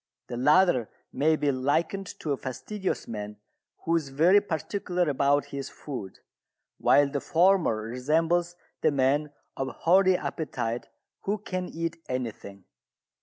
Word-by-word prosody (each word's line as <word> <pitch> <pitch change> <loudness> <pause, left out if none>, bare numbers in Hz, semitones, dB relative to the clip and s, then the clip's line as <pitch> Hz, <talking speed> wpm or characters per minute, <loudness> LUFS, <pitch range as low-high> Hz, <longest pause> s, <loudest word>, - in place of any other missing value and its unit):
The 120 - -4
latter 150 - +4 0.2
may 155 +3 +3
be 145 -2 +1
likened 160 +9 0
to 155 - -2
a 140 - 0
fastidious 190 +11 -4
man 105 -2 -6 0.5
who 165 - +1
is 155 -4 -1
very 170 +9 +5
particular 180 0 -2
about 140 0 +2
his 135 -1 -4
food, 125 -10 -8 0.6
while 145 0 +5
the 140 0 -3
former 170 - +3
resembles 160 +9 0 0.3
the - - +4
man 145 +2 +1 0.2
of 135 - -2
hearty 185 +8 +3
appetite 120 -7 -3 0.3
who 205 +2 -1
can 185 -3 -4
eat 165 0 -4
anything. 110 -6 -5
150 Hz, 130 wpm, -27 LUFS, 130-175 Hz, 0.6 s, very